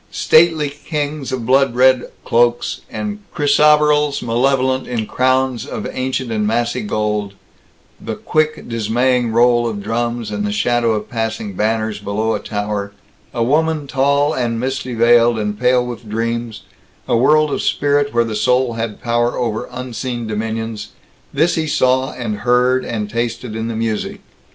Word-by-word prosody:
Stately 155 Hz, -3 st, +3 dB
kings 145 Hz, -1 st, -4 dB
of 125 Hz, -3 st, -3 dB
blood 130 Hz, 0 st, +3 dB
red 130 Hz, 0 st, +4 dB, 0.2 s
cloaks 120 Hz, +1 st, +1 dB
and 210 Hz, 0 st, -4 dB, 0.2 s
chrysoberyls 150 Hz, 0 st, +3 dB
malevolent 130 Hz, +2 st, +1 dB
in 115 Hz, -3 st, -2 dB
crowns 130 Hz, -1 st, +1 dB
of -, -, -5 dB
ancient 130 Hz, -1 st, -3 dB
and 105 Hz, -1 st, 0 dB
massy 120 Hz, -, 0 dB
gold 105 Hz, -, -2 dB, 0.7 s
the -, -, -4 dB
quick 155 Hz, 0 st, -1 dB
dismaying 120 Hz, +2 st, +1 dB
roll 120 Hz, +1 st, +3 dB
of 105 Hz, -3 st, -4 dB
drums 115 Hz, +1 st, -2 dB
and 105 Hz, 0 st, -2 dB
the 105 Hz, -, -1 dB
shadow 115 Hz, +2 st, +1 dB
of 105 Hz, -1 st, -3 dB
passing 110 Hz, -3 st, -3 dB
banners 110 Hz, +1 st, -1 dB
below 105 Hz, +2 st, -1 dB
a -, -, -1 dB
tower 105 Hz, -1 st, -4 dB, 0.4 s
a 115 Hz, -, -1 dB
woman 155 Hz, +3 st, +1 dB
tall 140 Hz, +2 st, +1 dB
and 115 Hz, -2 st, -1 dB
misty 130 Hz, 0 st, -3 dB
veiled 120 Hz, 0 st, +4 dB
and 105 Hz, -1 st, -3 dB
pale 125 Hz, 0 st, +3 dB
with 120 Hz, -2 st, -8 dB
dreams 115 Hz, 0 st, -3 dB, 0.4 s
a -, -, +2 dB
world 150 Hz, +5 st, +4 dB
of -, -, -1 dB
spirit 145 Hz, 0 st, +1 dB
where 120 Hz, 0 st, +2 dB
the 110 Hz, -1 st, -4 dB
soul 125 Hz, +3 st, +2 dB
had 115 Hz, -2 st, -5 dB
power 120 Hz, 0 st, 0 dB
over 115 Hz, -3 st, -2 dB
unseen 125 Hz, -1 st, -5 dB
dominions 110 Hz, 0 st, -4 dB, 0.4 s
this 160 Hz, +5 st, +2 dB
he 160 Hz, -1 st, -1 dB
saw 130 Hz, -2 st, +2 dB
and 110 Hz, -4 st, -4 dB
heard 125 Hz, +3 st, +2 dB
and 105 Hz, -3 st, -3 dB
tasted 115 Hz, 0 st, -3 dB
in 110 Hz, 0 st, -3 dB
the 115 Hz, -, -4 dB
music. 110 Hz, -1 st, -2 dB
120 Hz, 155 wpm, -18 LUFS, 110-130 Hz, 0.7 s, red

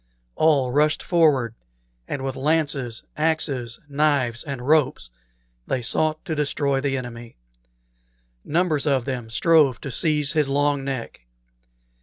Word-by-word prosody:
All 140 Hz, -5 st, +3 dB
rushed 150 Hz, +3 st, +2 dB
forward, 150 Hz, -10 st, +2 dB, 0.5 s
and 135 Hz, -, -4 dB
with 135 Hz, -1 st, -3 dB
lances, 140 Hz, -5 st, -1 dB
axes, 150 Hz, -7 st, -1 dB
knives, 140 Hz, -5 st, +1 dB
and 135 Hz, -3 st, -6 dB
ropes 140 Hz, -, +2 dB, 0.6 s
they 130 Hz, -2 st, -1 dB
sought 155 Hz, +8 st, 0 dB
to 165 Hz, -, -3 dB
destroy 140 Hz, -2 st, 0 dB
the 135 Hz, -1 st, -1 dB
enemy. 120 Hz, -, -8 dB, 1.1 s
Numbers 160 Hz, -2 st, 0 dB
of 135 Hz, -4 st, +1 dB
them 125 Hz, -4 st, -4 dB
strove 140 Hz, 0 st, +3 dB
to 140 Hz, -, -6 dB
seize 150 Hz, +1 st, +1 dB
his 150 Hz, -3 st, +1 dB
long 145 Hz, 0 st, +1 dB
neck. 130 Hz, -, -5 dB
140 Hz, 125 wpm, -23 LUFS, 125-155 Hz, 1.1 s, All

